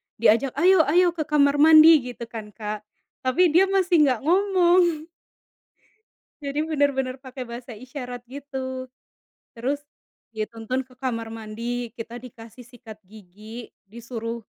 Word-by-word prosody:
Diajak, 245 +5 +2
"Ayo, 350 +1 +4
ayo, 350 +4 +4
ke 320 -3 -4
kamar 285 -1 +3
mandi," 315 +1 +8
gitu 245 -1 -7
kan, 220 -3 -9
Kak. 210 -1 -6 0.3
Tapi 325 +7 +2
dia 370 +5 +5
masih 370 -3 +2
enggak 255 -3 0
ngomong. 350 -2 +3 1.4
Jadi 285 +2 -2
benar 290 -3 +1
benar 255 -1 -2
pakai 260 -1 -8
bahasa 235 0 -9
isyarat 250 0 -8
gitu. 260 -1 -6 0.7
Terus, 260 +5 -2 0.6
dituntun 225 +4 -3
ke 255 0 -22
kamar 230 -4 -3
mandi, 230 +2 -5
kita 235 0 -8
dikasih 230 -1 -13
sikat 225 -3 -13
gigi. 215 +3 -12 0.2
Disuruh 230 +1 -7
255 Hz, 130 wpm, -24 LUFS, 230-300 Hz, 1.4 s, mandi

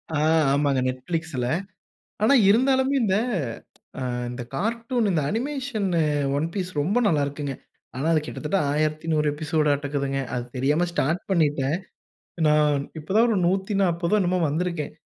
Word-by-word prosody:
ஆ - - +1 0.3
ஆமாங்க 140 -2 +2
நெட்பிளிக்ஸ்ல. 135 +1 -3 0.8
ஆனா 220 +6 +5 0.2
இருந்தாலுமே 265 +5 +3
இந்த 190 -3 +2 0.9
அ - - -3 0.3
அந்த 125 +1 -5
கார்ட்டூன் 230 - -1
இந்த 165 -5 +1
அனிமேஷன்னு 230 - -1 0.4
"ஒன் 150 +3 0
பீஸ்" 185 -3 -2
ரொம்ப 190 +11 +1
நல்லா 155 -7 +2
இருக்குங்க. 140 -1 -4 0.4
ஆனா 135 +4 -2
அது 155 - +3
கிட்டத்தட்ட 155 +6 -2
1100 155 +1 0
எபிசோடாட்டுக்குதுங்க. 145 -2 0
அது 120 -1 -2
தெரியாம 145 +7 +2
ஸ்டார்ட் 170 +2 0
பண்ணீட்டேன். 150 -4 +1 0.7
நா 150 - +5 0.5
இப்போதான் 205 +10 +2
ஒரு 220 - +1
140ஓ 190 -1 +1
என்னமோ 180 0 +1
வந்திருக்கேன். 165 -1 -2
165 Hz, 125 wpm, -24 LUFS, 145-200 Hz, 0.9 s, ஆனா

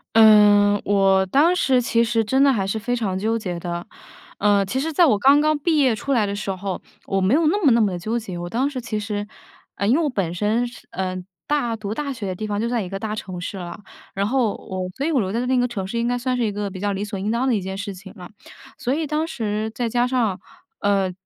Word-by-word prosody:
嗯， 205 -2 +6
我 195 -1 +3
当 315 - +4
时 260 -7 +3
其 230 0 +2
实 225 0 +1
真 265 +6 +2
的 280 - +5
还 200 -6 0
是 220 +3 -2
非 245 +3 -1
常 195 -5 -2
纠 225 +3 0
结 180 -5 -4
的。 175 0 -5 0.5
呃， 200 -1 +3
其 260 +7 -2
实 320 +3 -2
在 340 +3 +5
我 215 -8 +3
刚 280 +4 +6
刚 305 0 +2
毕 320 +1 +1
业 260 -6 +3
出 275 +5 -2
来 220 -4 +3
的 200 0 -3
时 200 -1 -5
候， 190 0 -4 0.2
我 195 0 0
没 190 +7 +2
有 325 0 +2
那 405 +4 +1
么 275 - +6
那 230 0 +4
么 205 -3 +2
的 175 - -4
纠 220 +6 -2
结。 190 -6 -6
我 175 0 -5
当 260 +7 0
时 260 -3 -5
其 220 -2 -3
实 205 0 -4 0.5
呃， 200 - -2
因 245 - +4
为 - - +1
我 295 - +1
本 185 -8 -2
身 215 +6 0
是 245 - -11
呃， 185 -1 -3 0.3
大 260 -6 0
读 210 -1 -5
大 285 +2 -3
学 230 -6 -6
的 185 - -2
地 215 +4 -5
方 205 0 -2
就 230 - 0
在 235 -2 0
一 180 - -5
个 195 - -4
大 215 0 -3
城 185 -4 -6
市 190 +3 -5
了。 175 +2 -7 0.4
然 200 +1 0
后 245 -4 +1
我 185 -1 -5
所 280 - -1
以 330 - 0
我 275 - +2
留 190 -2 -1
在 235 +3 -1
那 255 0 +1
个 245 0 +2
城 200 -6 -4
市 235 +3 -3
应 235 - 0
该 245 0 0
算 250 +1 -1
是 240 - 0
一 210 - -1
个 205 -1 -4
比 185 - -8
较 205 0 -1
理 195 +1 -3
所 200 -2 -5
应 205 +2 -2
当 240 +4 0
的 250 - +3
一 200 - -1
件 190 +1 -5
事 200 0 -5
情 190 +1 -12
了。 180 -3 -10 0.5
所 255 - -1
以 315 +1 -1
当 310 +2 -1
时 220 -5 -2
再 240 -2 -1
加 245 +2 +1
上， 230 -7 0 0.4
呃， 195 -2 +1
215 Hz, 295 characters per minute, -22 LUFS, 195-250 Hz, 0.5 s, 嗯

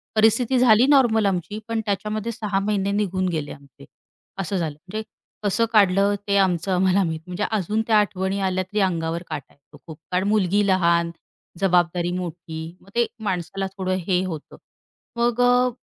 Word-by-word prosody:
परिस्थिती 230 +4 +3
झाली 240 0 +6
नॉर्मल 240 -7 +4
आमची. 190 +2 -1
पण 225 -1 -1
त्याच्यामध्ये 210 +3 -2
6 210 -4 -2
महिने 200 -1 0
निघून 190 -2 0
गेले 155 -4 -3
आमचे, 140 - -14 0.5
असं 195 0 -2
झालं. 155 -4 -3
म्हणजे 215 +3 -4 0.4
कसं 205 +3 +2
काढलं 200 0 +4
ते 200 - +1
आमचं 185 -1 +1
आम्हाला 190 +1 +3
माहित. 160 -2 -2
म्हणजे 180 +3 -3
अजून 215 +1 0
त्या 220 -2 +4
आठवणी 195 -1 -1
आल्या 185 -1 0
तरी 205 +3 -3
अंगावर 170 -2 -1
काटा 145 -4 -7
येतो 140 - -20
खूप. 155 -2 -9
कारण 185 +2 +1
मुलगी 205 -1 +2
लहान, 170 -2 +2 0.5
जबाबदारी 175 -1 +2
मोठी. 170 -1 -6
मग 195 - -19
ते 235 0 +3 0.2
माणसाला 190 0 -2
थोडं 185 0 -1
हे 185 -1 +2
होतं 160 -5 -7 0.6
मग 240 0 +1
अ 245 0 +4
190 Hz, 165 wpm, -23 LUFS, 175-210 Hz, 0.6 s, झाली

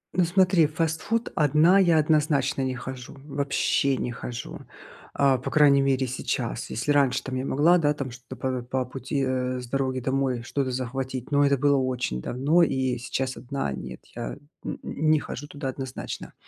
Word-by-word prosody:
Ну 180 -2 +4
смотри, 180 -2 +4
в 155 - -16
фастфуд 165 +8 -1
одна 155 +6 +5
я 170 -4 +4
однозначно 150 -3 +2
не 130 -1 -1
хожу. 130 +1 -8
Вообще 140 -1 +1
не 120 - -2
хожу. 120 +1 -6 0.6
А, 135 -2 +4
по - - -4
крайней 140 -2 +5
мере 135 -1 +2
сейчас. 115 - -3
Если 120 +6 -1
раньше 135 -3 +3
там 130 -1 -4
я 130 +1 -2
могла, 160 +7 +4
да, 150 -2 +2
там 135 -3 -4
что-то 125 +1 -10
п 130 0 -2
по 130 +1 -2
пути, 135 +2 -3
э, 130 -1 -1
с 125 - -8
дороги 130 0 -1
домой 130 -1 0
что-то 135 +1 -2
захватить, 130 +1 -4
но 145 0 +4
это 140 -1 +3
было 140 +1 +3
очень 125 - -1
давно. 145 +8 +2
И 130 -4 0
сейчас 130 +1 -3
одна- 125 - -3
нет. 65 -1 -7 0.2
Я 120 -1 -5 0.3
н - - -4
не 155 0 +2
хожу 145 +1 -7
туда 145 -2 -6
однозначно. 130 0 -6
135 Hz, 180 wpm, -26 LUFS, 130-145 Hz, 0.6 s, одна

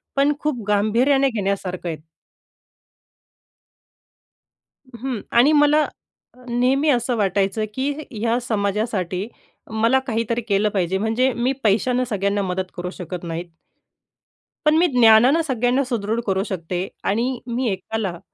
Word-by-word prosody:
पण 280 +1 +3
खूप 285 -7 -2
गांभीर्याने 245 +7 +3
घेण्यासारखं 195 -5 -3
आहे. 160 - -4 3.0
हं, 245 0 -4
आणि 250 +6 +5
मला 295 +1 +5 0.5
अ, 250 - -17
नेहमी 260 +5 +2
असं 245 -2 +1
वाटायचं 200 +1 0
की 265 +2 -1 0.2
ह्या 230 +2 0
समाजासाठी 200 -4 -1 0.4
मला 230 +4 +3
काहीतरी 230 0 -1
केलं 210 -2 +1
पाहिजे 190 -2 0
म्हणजे 225 +6 +1
मी 240 +2 0
पैशानं 230 +4 +2
सगळ्यांना 200 -1 0
मदत 185 -1 -3
करू 180 0 -3
शकत 180 -1 -6
नाहीत. 170 +1 -5 1.2
पण 300 +1 +5
मी 350 +2 +4
ज्ञानानं 235 +7 +6
सगळ्यांना 250 +1 +1
सुदृढ 225 -2 -1
करू 195 0 +1
शकते 180 0 -3 0.2
आणि 240 +4 0 0.2
मी 255 -1 0
एकाला 190 -1 -4
220 Hz, 120 wpm, -21 LUFS, 195-250 Hz, 3.0 s, ज्ञानानं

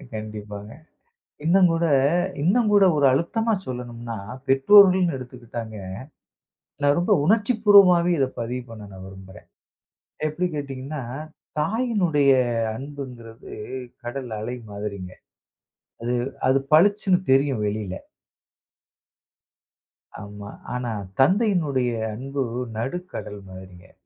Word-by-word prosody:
கண்டிப்பாங்க. 105 -1 -7 0.7
இன்னும் 180 +3 +5
கூட 165 +1 0 0.6
இன்னும் 210 +7 +3
கூட 205 -1 +6
ஒரு 145 -2 +4
அழுத்தமா 225 - 0
சொல்லணும்னா 120 -2 -6 0.3
பெற்றோர்கள்னு 180 +5 +6
எடுத்துக்கிட்டாங்க, 120 -3 -8 1.1
நான் 145 0 +4
ரொம்ப 175 - +1
உணர்ச்சிப்பூர்வமாவே 205 -4 +5
இத 135 - +3
பதிவு 125 +2 -3
பண்ண 110 -2 -9
நான் 95 0 -10
விரும்புறேன். 95 -1 -13 0.8
எப்டி 155 +4 -1
கேட்டீங்கன்னா, 140 0 -5 0.6
தாயினுடைய 180 - +1 0.5
அன்புங்கிறது 125 -4 -9 0.5
கடல் 125 +1 -5
அலை 120 +3 -4
மாதிரிங்க. 100 -3 -6 0.9
அது 120 +1 -1 0.3
அது 130 +1 +4
பளிச்சுனு 195 +3 +4
தெரியும் 135 -4 +2
வெளியில. 105 -2 -3 2.3
ஆமா. 105 0 -9 0.2
ஆனா 125 -1 -3 0.3
தந்தையினுடைய 170 - +2 0.3
அன்பு 135 +4 -3 0.3
நடுக்கடல் 130 - -5
மாதிரிங்க. 95 -1 -13
135 Hz, 90 wpm, -23 LUFS, 115-180 Hz, 2.3 s, கூட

